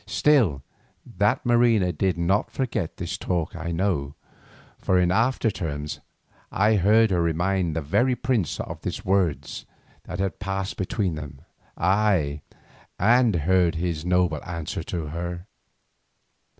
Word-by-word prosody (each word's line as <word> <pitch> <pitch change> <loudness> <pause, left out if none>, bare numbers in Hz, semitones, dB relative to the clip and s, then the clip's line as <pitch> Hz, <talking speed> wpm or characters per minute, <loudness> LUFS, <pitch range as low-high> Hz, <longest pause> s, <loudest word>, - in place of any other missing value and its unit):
Still 110 - +2 0.4
that 105 +9 0
Marina 120 -6 +3
did 90 +2 0
not 85 +5 +1
forget 120 -11 -3
this 95 +4 -4
talk 85 -3 -2
I 85 0 -4
know, 80 -6 -1 0.6
for 95 - +1
in 90 -1 +2
after 115 +2 +2
times 75 -5 -4 0.5
I 105 +3 +3
heard 105 +3 +4
her 90 -2 +2
remind 85 +1 0
this 80 -3 -3
very 125 - +2
prince 120 - -1
of - - -6
the - - -4
words 95 -5 0 0.4
that - - -6
had 95 -1 -2
passed 95 -1 -3
between 95 -1 -1
them, 70 -3 -8 0.4
ay, 90 -6 +1 0.6
and 115 +1 +4
heard 90 -2 +3
his 80 -2 -2
noble 90 -3 +1
answer 85 -3 -4
to 85 -3 -4
her. 85 +2 -5
90 Hz, 135 wpm, -24 LUFS, 85-105 Hz, 0.6 s, heard